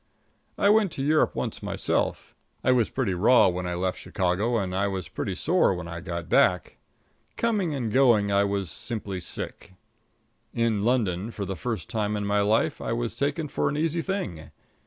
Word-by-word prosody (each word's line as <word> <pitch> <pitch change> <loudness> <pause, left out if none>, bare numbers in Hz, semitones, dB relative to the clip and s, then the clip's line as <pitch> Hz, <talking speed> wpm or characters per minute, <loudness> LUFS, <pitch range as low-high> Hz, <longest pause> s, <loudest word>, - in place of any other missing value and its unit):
I 200 - +4
went 210 -4 +3
to 135 - -3
Europe 155 +2 +2
once - - -3
myself. - - -2 0.3
I 130 - +4
was 120 -3 +3
pretty 120 -8 -1
raw 110 +7 +5
when 90 0 -3
I 90 - -2
left 90 +1 -2
Chicago, 100 +6 0
and 95 -3 -2
I 100 +1 +1
was 95 -4 -4
pretty - - -4
sore 95 - +2
when 90 -1 -6
I 85 0 -6
got 85 -1 -5
back. 90 0 +2 0.6
Coming 205 -9 0
and 120 -6 -3
going 120 -6 +4
I 100 0 +4
was 100 -3 -2
simply 105 -5 -5
sick. 90 - -5 0.8
In 115 -3 +1
London, 105 -4 0
for 105 -3 -5
the 95 - -4
first 115 +2 -4
time 105 -2 -1
in 105 - -3
my 100 0 +2
life, 105 +2 +1
I 115 - -2
was 120 0 -2
taken 145 +3 -1
for - - 0
an 145 - -3
easy 165 +2 0
thing. 165 - -4
105 Hz, 185 wpm, -26 LUFS, 95-130 Hz, 0.8 s, raw